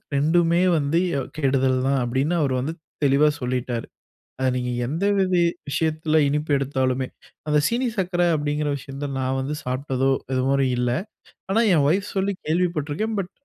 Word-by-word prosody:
2மே 170 +4 +3 0.2
வந்து 145 +2 +1 0.2
எ - - +1 0.2
கெடுதல் 135 -2 +2
தான், 135 -1 +2
அப்டின்னு 135 +8 0
அவரு 135 -3 +1
வந்து 155 +5 -3 0.3
தெளிவா 140 +2 +4
சொல்லீட்டாரு. 125 -1 -2 0.5
அத 130 - +1
நீங்க 125 -1 -2
எந்த 160 +10 -2
வித 185 -1 +1 0.4
விஷயத்தில 155 +1 0
இனிப்பு 150 +1 -1
எடுத்தாலுமே. 130 -1 -1 0.4
அந்த 150 0 +3
சீனி 245 +2 0
சக்கர 180 -2 0
அப்டிங்கிற 150 0 -1
விஷயத்த 135 +2 -6
நான் 130 0 -1
வந்து 140 +3 -3
சாப்பிட்டதோ! 130 +1 -1 0.2
இது 130 - +1
வர 140 0 +2 0.2
இல்ல. 125 0 +1 0.6
ஆனா 220 +4 +3
ஏ 175 - +5
வொய்ஃப் 195 +6 +1
சொல்லி 195 +1 +1
கேள்விப்பட்ருக்கேன். 170 +4 -1
பட் 180 0 -5
145 Hz, 150 wpm, -23 LUFS, 130-165 Hz, 0.6 s, ஏ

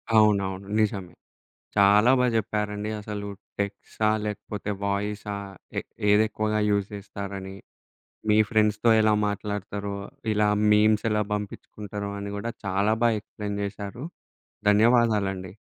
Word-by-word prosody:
అవునవును 100 -3 +3
నిజమే. 100 -4 -1 0.6
చాలా 105 +4 +6
బాగా 125 -1 +3
చెప్పారండి 105 -1 -2
అసలు 105 -1 -5 0.3
టెక్స్ట్సా! 100 +1 -2 0.2
లేకపోతే 105 0 -4
వాయిసా! 105 +1 -2 0.4
ఏ - - +2 0.3
ఏదేక్కువగా 110 0 +2
యూజ్ 100 -1 +1
చేస్తారని, 100 -1 -7 0.7
మీ 105 - +5
ఫ్రెండ్స్‌తో 110 0 +3
ఎలా 110 0 +4
మాట్లాడతారో, 100 0 -4 0.4
ఇలా 105 0 +3 0.2
మీమ్స్ 105 +1 +4
ఎలా 105 0 +2
పంపించుకుంటారో, 105 0 -5
అని 100 0 -5
కూడా 115 +3 -3
చాలా 100 +3 +2
బాగా 115 -2 +3
ఎక్స్‌ప్లెయిన్ 100 -1 -5
చేశారు 100 +4 -6 0.7
ధన్యవాదాలండి. 105 -4 +3
105 Hz, 105 wpm, -26 LUFS, 100-105 Hz, 0.7 s, చాలా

